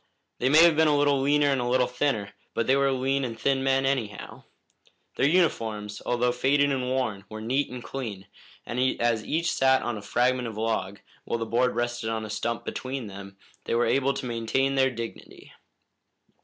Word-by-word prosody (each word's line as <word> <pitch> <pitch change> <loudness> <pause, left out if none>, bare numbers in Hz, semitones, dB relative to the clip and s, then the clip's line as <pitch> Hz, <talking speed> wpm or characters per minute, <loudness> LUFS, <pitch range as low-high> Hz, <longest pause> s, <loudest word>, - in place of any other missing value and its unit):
They 130 - +2
may 155 +4 +7
have 170 -2 +6
been 160 0 +4
a 150 -1 +3
little 145 -1 +3
leaner 145 +1 +3
and 135 -2 +1
a 120 - -2
little 125 0 +3
thinner, 125 -5 -1 0.2
but 115 - 0
they 130 - +3
were 140 0 +2
lean 135 +1 0
and 115 -3 -5
thin 135 +2 +1
men, 135 0 +2
anyhow. 120 -7 -3 0.7
Their 140 - +2
uniforms, 110 - 0
although 125 0 +1
faded 140 +3 +2
and 135 -1 0
worn, 125 -7 -1
were 110 - -7
neat 130 +6 -1
and 125 -1 -8
clean, 110 -8 -6 0.4
and 120 - -4 0.2
as 115 -2 +1
each 165 +5 0
sat 130 0 +3
on 120 -3 -3
a - - -10
fragment 125 +4 +1
of 110 -2 -7
log, 105 -3 -2 0.2
while - - -1
the 115 - -3
board 120 +3 +1
rested 120 -1 -2
on 110 -1 -3
a 105 - -7
stump 115 +2 -3
between, 105 -7 -6 0.3
they - - -1
were 120 - +2
able 135 +1 +1
to 135 - -5
maintain 120 +3 0
their 135 -1 +3
dignity. 115 -2 -8
125 Hz, 195 wpm, -26 LUFS, 115-135 Hz, 0.7 s, may